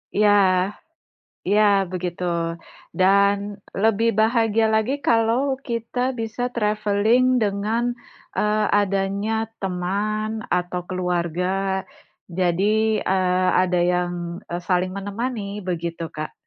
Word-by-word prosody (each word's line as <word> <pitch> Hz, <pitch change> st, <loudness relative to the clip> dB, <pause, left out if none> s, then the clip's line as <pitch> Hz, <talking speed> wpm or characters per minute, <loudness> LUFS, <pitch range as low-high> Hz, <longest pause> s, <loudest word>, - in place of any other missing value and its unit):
Iya. 210 Hz, 0 st, +4 dB, 1.2 s
Iya 210 Hz, +2 st, +4 dB, 0.3 s
begitu. 180 Hz, 0 st, -4 dB, 0.8 s
Dan 200 Hz, +2 st, +5 dB, 0.5 s
lebih 225 Hz, +1 st, +3 dB
bahagia 225 Hz, -1 st, +3 dB
lagi 220 Hz, +5 st, +1 dB
kalau 240 Hz, +4 st, +2 dB
kita 235 Hz, 0 st, -4 dB, 0.2 s
bisa 225 Hz, +2 st, -4 dB
traveling 215 Hz, +2 st, +2 dB, 0.2 s
dengan, 210 Hz, +3 st, 0 dB, 0.6 s
eee, 210 Hz, 0 st, +2 dB
adanya 200 Hz, +2 st, 0 dB, 0.3 s
teman 200 Hz, +4 st, -2 dB, 0.3 s
atau 180 Hz, 0 st, -3 dB
keluarga. 180 Hz, -1 st, -1 dB, 0.9 s
Jadi, 185 Hz, +4 st, +2 dB, 0.3 s
eee, 185 Hz, -1 st, +1 dB
ada 180 Hz, -1 st, +1 dB
yang, 180 Hz, 0 st, 0 dB, 0.4 s
eee, 175 Hz, +1 st, -3 dB
saling 185 Hz, 0 st, +1 dB
menemani 205 Hz, 0 st, -4 dB
begitu, 170 Hz, -1 st, -3 dB
Kak. 155 Hz, 0 st, -4 dB
200 Hz, 95 wpm, -22 LUFS, 180-220 Hz, 1.2 s, Dan